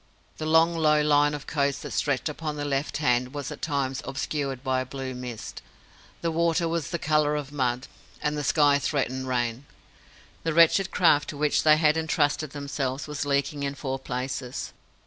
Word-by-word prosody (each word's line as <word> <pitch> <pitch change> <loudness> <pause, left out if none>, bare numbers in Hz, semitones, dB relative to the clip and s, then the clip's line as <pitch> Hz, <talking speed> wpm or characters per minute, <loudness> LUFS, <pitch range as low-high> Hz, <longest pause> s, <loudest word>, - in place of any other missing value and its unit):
The 155 - -3
long 165 +1 +4
low 155 -2 +3
line 145 0 +3
of 145 0 -8
coast 140 -3 -1
that - - -6
stretched 140 -1 0
upon 150 0 -4
their 145 0 -3
left 140 0 -1
hand 125 -2 +1
was 145 -3 -4
at - - -8
times 140 -3 -1
obscured 135 -1 -3
by 130 -1 +1
a - - -4
blue 135 -1 -5
mist. 125 -3 -7 0.6
The 170 - 0
water 170 +1 +1
was 165 -3 -2
the 170 - -2
colour 150 -1 +2
of 145 -1 -4
mud, 130 -2 -1 0.3
and 150 0 -1
the 150 - -2
sky 145 -1 +4
threatened 130 -3 -1
rain. 120 +1 -1 0.7
The 165 -1 -2
wretched 170 +3 +5
craft 160 -6 +3
to 145 - -6
which 150 0 +2
they 155 -1 +6
had 155 0 +3
entrusted 155 -1 +1
themselves 140 -2 -3
was 145 -1 -4
leaking 140 +1 0
in 140 0 -2
four 135 -1 -3
places. 130 0 -4
145 Hz, 185 wpm, -26 LUFS, 135-155 Hz, 0.7 s, they